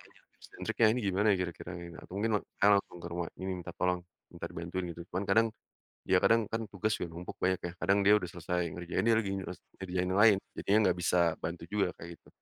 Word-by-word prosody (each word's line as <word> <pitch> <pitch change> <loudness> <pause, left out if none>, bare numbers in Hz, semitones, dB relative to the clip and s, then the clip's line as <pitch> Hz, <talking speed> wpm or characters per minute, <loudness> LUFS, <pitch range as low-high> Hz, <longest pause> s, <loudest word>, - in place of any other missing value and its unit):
tanya - - -23
tips - - -16
and - - -5
triknya 115 - +4
ini 125 - -1
gimana 100 +3 +2
ya - - +3
kira-kira 85 0 -8
gitu 85 -1 -9
atau - - -13
mungkin 110 +2 +1 0.3
saya 100 - +5
langsung 90 - -7
ke - - -6
rumah 85 -1 -2
minta 95 -2 -4
tolong, 90 -1 +1 0.3
minta 85 -1 -6
bantuin 85 +2 -4
gitu, 85 - -8
cuman 95 +3 -1
kadang, 110 +3 +5 0.6
ya 95 - +5
kadang 115 0 +5
kan 115 0 -2
tugas 105 +2 0
udah 85 - -3
numpuk 85 +2 -7
banyak 95 -1 +2
ya, 90 - -4
kadang 95 +3 +3
dia 105 - +8
udah 90 - -5
selesai 90 0 -2
ngerjain, 90 0 -2
dia 115 - +6
lagi 100 -3 -3
nyes 95 -1 -6 0.2
ngerjain 90 -1 -2
yang 95 - +1
lain 110 -3 +8 0.2
jadinya 100 +2 +3
enggak 90 - +2
bisa 90 - +2 0.2
bantu 85 0 -5
juga, 100 -2 +2
kayak 85 - -8
gitu - - -24
90 Hz, 230 wpm, -31 LUFS, 85-100 Hz, 0.6 s, dia